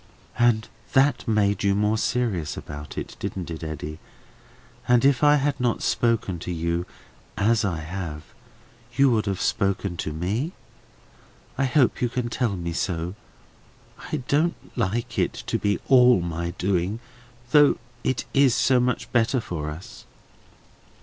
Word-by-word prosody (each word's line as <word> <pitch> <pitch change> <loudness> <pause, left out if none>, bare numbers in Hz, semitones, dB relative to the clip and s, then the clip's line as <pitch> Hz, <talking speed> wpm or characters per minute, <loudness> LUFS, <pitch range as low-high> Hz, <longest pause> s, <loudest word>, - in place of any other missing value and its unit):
"And 120 -2 +3 0.3
that 135 0 +3
made 100 -3 +2
you 100 0 +3
more 105 +1 +2
serious 100 -14 -1
about 75 0 -8
it, - - -5
didn't 90 -3 -4
it, 80 0 -6
Eddy? 75 0 -5 0.9
And 125 +1 +4
if 135 -2 +3
I 145 0 +7
had 145 -1 0
not 120 -2 0
spoken 115 -7 +1
to 90 - -5
you, 85 +1 -2 0.5
as 110 +2 +2
I 85 -6 -1
have, 80 -2 -5 0.7
you 135 +1 +5
would 110 -2 +1
have 95 -2 -1
spoken 100 -2 0
to 80 - -3
me? 105 - -2 1.0
I 135 +1 +1
hope 130 0 +2
you 120 - +2
can 120 0 -2
tell 120 -4 -1
me 85 -1 -4
so? 85 0 -2 1.0
I 150 -5 -2
don't 160 +4 +2 0.2
like 115 0 -1
it - - +1
to - - -1
be 100 0 +1
all 125 -4 +6
my 85 0 -3
doing, 95 +3 0 0.5
though 145 0 +6 0.3
it 130 - -1
is 135 -3 +4
so 130 -2 +3
much 125 +1 -1
better 120 +2 +2
for 85 -9 -4
us." 80 +4 -10
105 Hz, 150 wpm, -24 LUFS, 85-125 Hz, 1.0 s, I